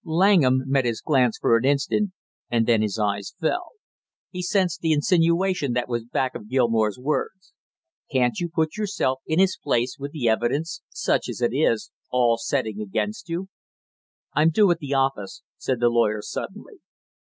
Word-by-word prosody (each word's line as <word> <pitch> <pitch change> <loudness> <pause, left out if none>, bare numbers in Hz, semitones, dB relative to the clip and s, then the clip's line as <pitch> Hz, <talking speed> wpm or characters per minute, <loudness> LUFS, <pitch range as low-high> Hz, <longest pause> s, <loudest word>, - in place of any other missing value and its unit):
Langham 160 -7 +3
met 135 0 +2
his 115 -2 -1
glance 130 -6 +2
for 115 - +3
an 115 - +1
instant 145 +9 +1 0.4
and 115 -1 +2
then 115 -2 +3
his 105 -1 -1
eyes 100 +1 -2
fell. 355 - -1 0.6
He 180 - -5
sensed 185 -2 0
the 160 -1 +2
insinuation 170 -1 +2
that 125 0 -1
was 120 -2 -3
back 130 +2 -1
of 105 -1 -9
Gilmore's 115 -5 +2
words. 155 - -3 0.6
"Can't 130 +7 +1
you 175 -1 -2
put 160 +2 -1
yourself 195 -11 -1
in 155 - 0
his 190 0 +3
place, 120 +1 0
with 140 +1 -5
the 140 -7 -2
evidence, 125 +8 0
such - - -1
as - - -5
it 120 -1 +1
is, 130 -6 +1 0.2
all 120 -2 +2
setting 115 -4 -2
against 105 - -3
you?" 180 +3 -3 0.8
"I'm 155 +2 +4
due 200 +3 +4
at 170 - 0
the 140 -3 -3
office," 135 -7 -1
said 130 -3 -2
the 120 0 +4
lawyer 110 -3 +1
suddenly. - - -7
135 Hz, 170 wpm, -24 LUFS, 115-165 Hz, 0.8 s, I'm